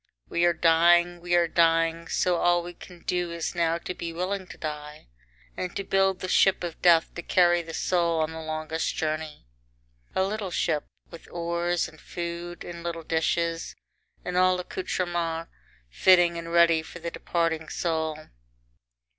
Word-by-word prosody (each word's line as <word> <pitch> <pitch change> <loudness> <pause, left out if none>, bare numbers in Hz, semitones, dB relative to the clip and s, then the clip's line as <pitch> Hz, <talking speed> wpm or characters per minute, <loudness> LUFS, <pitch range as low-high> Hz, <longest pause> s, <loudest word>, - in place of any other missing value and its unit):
VII - - -43
We 175 - +5
are 175 - +4
dying, 175 +1 +4
we 175 0 0
are 170 -1 +4
dying, 165 0 +2
so 180 +1 +1
all 175 0 +3
we 175 +1 -8
can 175 0 -14
do 180 -1 -1
is 170 -1 -3
now 170 -1 +1
to 170 - -6
be 170 -2 -5
willing 185 +3 -3
to - - -11
die, 150 - -7 0.5
and 180 -1 -4
to 200 - -2
build 195 -1 +1
the 185 - -3
ship 190 0 +3
of 170 -2 -5
death 170 -2 +5
to 175 - -6
carry 175 0 +3
the 165 -1 -8
soul 170 -2 +1
on 155 0 0
the 160 0 -7
longest 155 +1 -3
journey. 155 - -3 0.7
A 190 - +3
little 200 0 -2
ship, 160 -3 0 0.3
with 170 - -12
oars 170 0 -1
and 155 - -16
food 175 0 -6
and 170 -1 -8
little 170 -1 -4
dishes, 165 +1 -1 0.5
and 180 - -3
all 185 0 +4
accoutrements 175 -2 -3 0.4
fitting 175 - +5
and 170 0 -6
ready 170 -1 +5
for 160 +2 -10
the 170 0 -5
departing 165 -2 -1
soul. 160 -2 -1
170 Hz, 170 wpm, -26 LUFS, 165-175 Hz, 0.7 s, We